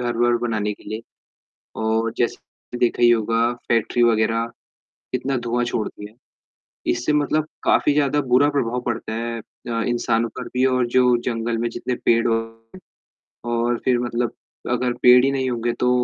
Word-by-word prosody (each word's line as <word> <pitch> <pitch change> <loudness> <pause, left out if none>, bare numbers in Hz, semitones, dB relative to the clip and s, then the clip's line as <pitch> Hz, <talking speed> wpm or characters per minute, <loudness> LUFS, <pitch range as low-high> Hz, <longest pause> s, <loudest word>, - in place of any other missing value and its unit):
घर-वर 120 0 +1
बनाने 105 -2 -1
के - - -21
लिए 110 +1 -5 0.8
और 110 +1 0
जैसे 120 0 -4
देखा 120 0 +1
ही 120 - +7
होगा 115 +1 +2 0.2
फैक्ट्री 115 +1 +1
वग़ैरह 115 0 +2 0.7
कितना 130 +1 -1
धुआँ 120 0 -1
छोड़ती 110 -3 -4
हैं, 110 - -24 0.8
इससे 125 +5 0
मतलब 150 +1 +1 0.2
काफ़ी 145 - +3
ज़्यादा 145 0 +2
बुरा 135 +2 +3
प्रभाव 125 -4 -1
पड़ता 115 -2 -3
है 115 +1 -3
अ, 115 +1 -6
इंसानों 115 -1 0
पर 125 - -6
भी 125 +1 +2
और 130 -2 +2
जो 125 -1 +5
जंगल 115 -1 -1
में 120 +1 -1
जितने 125 +1 -3
पेड़ 115 +1 +3 1.2
और 120 0 0
फिर 125 -2 +3
मतलब 120 -1 -1 0.4
अगर 125 0 +1
पेड़ 125 +1 +7
हीं 135 -1 0
होंगे 120 -1 -1
तो 125 - +3
120 Hz, 155 wpm, -22 LUFS, 115-125 Hz, 1.2 s, ही